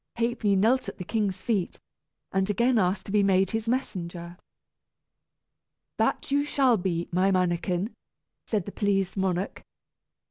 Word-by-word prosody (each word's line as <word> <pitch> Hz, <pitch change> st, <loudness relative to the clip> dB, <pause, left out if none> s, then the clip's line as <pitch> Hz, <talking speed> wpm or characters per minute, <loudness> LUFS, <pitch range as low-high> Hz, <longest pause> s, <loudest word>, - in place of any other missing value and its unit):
Ha'penny 230 Hz, -3 st, +1 dB
knelt 230 Hz, +7 st, +2 dB
at -, -, -10 dB
the -, -, -5 dB
king's 200 Hz, -1 st, -1 dB
feet, 205 Hz, -7 st, -1 dB, 0.6 s
and 190 Hz, +1 st, +1 dB
again 235 Hz, +3 st, +3 dB
asked 185 Hz, +1 st, 0 dB
to -, -, -6 dB
be 210 Hz, 0 st, +4 dB
made 195 Hz, -1 st, +3 dB
his 225 Hz, 0 st, -2 dB
messenger. 175 Hz, -8 st, -3 dB, 1.6 s
"That -, -, +1 dB
shall 280 Hz, -2 st, +2 dB
you -, -, -6 dB
be, 170 Hz, -2 st, -1 dB
my 185 Hz, +3 st, +3 dB
mannikin!" 180 Hz, +2 st, 0 dB, 0.5 s
said 210 Hz, -6 st, -1 dB
the 200 Hz, -, -6 dB
pleased 195 Hz, -3 st, 0 dB
monarch. 190 Hz, 0 st, -2 dB
195 Hz, 140 wpm, -27 LUFS, 180-225 Hz, 1.6 s, be